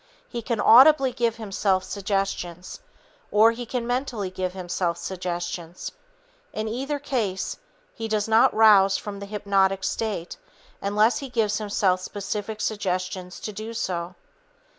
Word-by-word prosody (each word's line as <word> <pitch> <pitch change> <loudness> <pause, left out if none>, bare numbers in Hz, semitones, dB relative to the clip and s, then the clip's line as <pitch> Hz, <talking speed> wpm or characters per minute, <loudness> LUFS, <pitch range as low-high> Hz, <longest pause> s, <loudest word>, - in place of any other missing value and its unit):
He 235 - -5
can 230 -1 -2
audibly 265 +5 +7
give 235 -2 0
himself 195 -3 0
suggestions, 195 -3 -3 0.5
or 220 +2 +6
he 240 +1 -6
can 245 0 -2
mentally 245 -6 -2
give 185 -1 -3
himself 175 -2 -2
suggestions. 175 -1 -5 0.6
In 215 - -3
either 270 +6 -2
case, 230 -9 -2 0.4
he 225 - -5
does 215 -1 0
not 220 +1 +5
rouse 200 -3 +6
from 200 -1 -7
the 200 - -7
hypnotic 195 -2 +1
state 205 -6 -3 0.4
until 205 +2 +3
he 275 +1 -4
gives 220 -4 0
himself 200 -3 +1
specific 205 +2 -4
suggestions 185 -3 -3
to 215 - -5
do 220 +3 -6
so. 175 -3 -3
205 Hz, 135 wpm, -25 LUFS, 185-225 Hz, 0.6 s, audibly